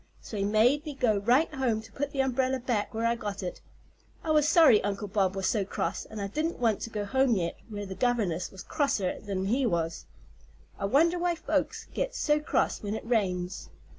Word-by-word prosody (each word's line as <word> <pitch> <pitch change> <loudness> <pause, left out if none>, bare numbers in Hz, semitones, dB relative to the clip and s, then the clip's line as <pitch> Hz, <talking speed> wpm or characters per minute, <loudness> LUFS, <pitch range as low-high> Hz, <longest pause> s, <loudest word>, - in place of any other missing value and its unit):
So - - -9
he 200 - 0
made 225 +8 +3
me 300 -3 -6
go 230 -6 +2
right 250 +10 +2
home 255 -6 0
to 225 - -15
put 285 0 -3
the 275 - +1
umbrella 265 0 +1
back 240 -4 -1
where 225 +1 -2
I 230 - +3
got 205 -3 -5
it. 180 - -5 0.6
I 315 - -1
was 300 -1 +4
sorry 310 -9 +6
Uncle 205 0 -2
Bob 195 -1 +1
was 195 -1 -2
so 210 -1 +1
cross, 190 - -3
and 220 - -8
I 200 - -2
didn't 310 - -2
want 225 -4 +1
to - - -4
go 210 -2 -3
home 265 +1 +2
yet, 170 -3 -2
where 205 -1 -5
the 190 - -6
governess 200 -7 0
was 190 - -10
crosser 275 - 0
'n 190 -1 -1
he 245 +7 +1
was. 165 -3 -2 0.7
I - - -1
wonder 330 - +3
why 350 0 +1
folks 325 - -1
get - - -2 0.3
cross - - +1
when 205 0 -3
it - - -6
rains? 185 -6 -1
225 Hz, 210 wpm, -28 LUFS, 200-270 Hz, 0.7 s, sorry